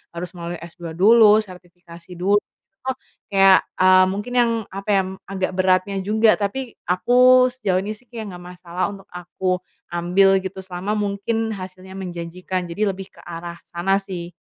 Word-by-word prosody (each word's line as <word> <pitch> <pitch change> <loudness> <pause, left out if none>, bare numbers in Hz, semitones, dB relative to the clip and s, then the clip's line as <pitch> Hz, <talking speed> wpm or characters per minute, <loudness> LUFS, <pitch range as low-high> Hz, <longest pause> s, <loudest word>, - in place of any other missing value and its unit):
harus 175 +1 -5
melalui 175 -1 -6
S2 170 -1 -9
dulu, 215 +3 +6
sertifikasi 175 -2 -14
dulu, 195 +4 +2
terus 265 +2 -8 0.3
kayak, 195 -1 +6 0.2
mmm, 185 0 +6
mungkin 205 +6 -4
yang, 235 -1 +3 0.2
apa 195 +2 -7
ya, 195 - +4
m 185 - -6 0.2
agak 190 -1 -2
beratnya 185 +1 +2
juga, 215 +3 +3
tapi 235 +5 -3 0.2
aku 250 +7 +5
sejauh 195 -7 0
ini 210 - -4
sih 245 +3 -27
ya 230 0 -7
nggak 185 -4 -8 0.2
masalah 175 0 -3
untuk 195 0 -13
aku 180 +1 -2 0.3
ambil 180 +3 +3
gitu 190 0 -6
selama 185 +2 -4
mungkin 210 +2 -1
hasilnya 185 -2 -8
menjanjikan, 180 0 -4
jadi 210 +5 0
lebih 190 0 -10
ke - - -20
arah 170 0 -7
sana 195 +3 0
sih. 180 -3 -7
190 Hz, 160 wpm, -21 LUFS, 180-205 Hz, 0.3 s, dulu